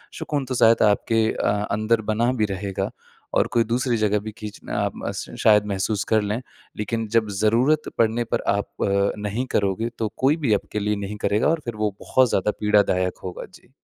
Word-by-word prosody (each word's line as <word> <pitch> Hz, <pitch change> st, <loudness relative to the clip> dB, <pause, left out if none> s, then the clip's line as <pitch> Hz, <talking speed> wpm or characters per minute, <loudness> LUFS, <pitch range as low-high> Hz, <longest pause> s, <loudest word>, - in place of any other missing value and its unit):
सुकून 145 Hz, -3 st, -2 dB
तो 130 Hz, -, -3 dB
शायद 115 Hz, -1 st, +5 dB
आपके 110 Hz, +2 st, +1 dB
अ, 105 Hz, 0 st, -1 dB
अंदर 110 Hz, +2 st, +1 dB
बना 120 Hz, +3 st, +2 dB
भी 105 Hz, -, +4 dB
रहेगा, 95 Hz, 0 st, -3 dB, 0.4 s
और -, -, +3 dB
कोई 115 Hz, -, +4 dB
दूसरी 120 Hz, +1 st, 0 dB
जगह 105 Hz, -1 st, +1 dB
भी 110 Hz, +1 st, -7 dB
खींचना 105 Hz, -1 st, -4 dB
अ, -, -, 0 dB
म -, -, -4 dB
श -, -, -7 dB
शायद 105 Hz, -1 st, +5 dB
महसूस 100 Hz, +1 st, -1 dB
कर 110 Hz, -, +4 dB
लें। 105 Hz, +4 st, -2 dB, 0.4 s
लेकिन 110 Hz, +1 st, -2 dB
जब 110 Hz, -2 st, +1 dB
ज़रूरत 125 Hz, +8 st, +2 dB
पड़ने 115 Hz, +1 st, +2 dB
पर -, -, +1 dB
आप 100 Hz, 0 st, -2 dB, 0.2 s
अ, 100 Hz, 0 st, +2 dB
नहीं 105 Hz, +5 st, -2 dB
करोगे 100 Hz, +3 st, 0 dB
तो 110 Hz, -2 st, 0 dB
कोई 140 Hz, +5 st, +3 dB
भी 135 Hz, -9 st, +1 dB
आपके 105 Hz, +1 st, -2 dB
लिए 105 Hz, +1 st, 0 dB
नहीं 105 Hz, -, -6 dB
करेगा 105 Hz, +2 st, +2 dB
और 165 Hz, -1 st, 0 dB
फिर 120 Hz, -2 st, -4 dB
वो 105 Hz, -2 st, -1 dB
बहुत 130 Hz, -1 st, +3 dB
ज़्यादा 100 Hz, +1 st, +1 dB
पीड़ादायक 100 Hz, -3 st, +2 dB
होगा। 90 Hz, -, -6 dB
जी। -, -, -18 dB
110 Hz, 200 wpm, -23 LUFS, 105-115 Hz, 0.4 s, शायद